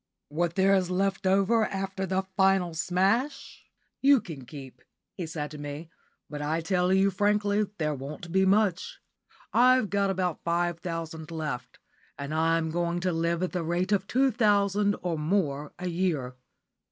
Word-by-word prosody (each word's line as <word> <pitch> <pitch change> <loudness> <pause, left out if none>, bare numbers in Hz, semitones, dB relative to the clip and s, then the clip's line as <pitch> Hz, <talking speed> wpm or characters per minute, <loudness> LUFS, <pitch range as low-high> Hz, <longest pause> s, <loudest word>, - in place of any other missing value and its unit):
"What 170 +3 -1
there 195 +1 +4
is 185 -2 +2
left 195 +1 0
over 195 +4 +3
after 195 0 -3
the 190 +1 0
final 190 -3 +3
smash 195 - -1 0.4
you 275 0 +6
can 155 - -9
keep," 130 -2 -10 0.4
said 155 -3 -5
he - - -9
to 145 - -8
me; 145 +3 -7 0.4
"but 150 -1 -6
I 155 +3 -1
tell 180 +2 +1
you 190 +1 +4
frankly 205 +1 +1
there 150 -2 0
won't 145 +5 -7
be 190 +2 +3
much. 195 -2 +1 0.5
I've 255 -2 +4
got 200 -1 +1
about 185 -3 -2
five 170 0 0
thousand 165 -2 -5
left, 155 -6 -5 0.4
and 140 +1 -5
I'm 160 0 +1
going 170 +1 -1
to 185 0 0
live 170 +1 0
at 185 - -1
the 180 - -2
rate 175 +4 -1
of 200 -1 +1
two 265 +2 +2
thousand 205 -2 +2
or 170 -3 -1
more 150 -4 -1
a 180 - -4
year. 165 -8 -1
180 Hz, 165 wpm, -27 LUFS, 160-195 Hz, 0.5 s, you